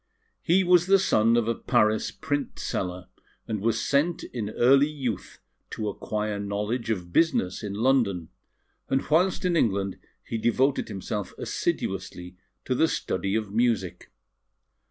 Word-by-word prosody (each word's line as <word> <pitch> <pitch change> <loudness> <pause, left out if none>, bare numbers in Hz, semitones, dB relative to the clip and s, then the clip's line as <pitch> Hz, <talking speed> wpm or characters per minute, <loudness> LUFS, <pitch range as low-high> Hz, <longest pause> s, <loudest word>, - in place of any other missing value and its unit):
He 185 +3 +3
was 180 -1 +4
the 195 +1 +6
son 115 - +3
of 115 -2 +1
a 115 - +2
Paris 110 -1 +1
print 145 -2 -3
seller, 90 -1 -3 0.4
and 105 -3 -3
was 115 +1 +1
sent 145 +8 +1
in 110 -4 -5
early 135 +6 +4
youth 130 -10 -4 0.3
to 105 -1 -3
acquire 105 0 -3
knowledge 105 +4 -2
of 90 -5 -3
business 150 - +2
in 100 -2 -5
London; 110 -8 +1 0.6
and 135 - 0
whilst 180 +4 +2
in 180 -1 +2
England 100 - 0 0.2
he 115 - -4
devoted 130 +5 +1
himself 105 0 -5
assiduously 90 0 -3 0.3
to 130 - 0
the 160 +6 +3
study 95 - -2
of 105 -2 -2
music. 105 -7 0
115 Hz, 140 wpm, -26 LUFS, 100-140 Hz, 0.6 s, the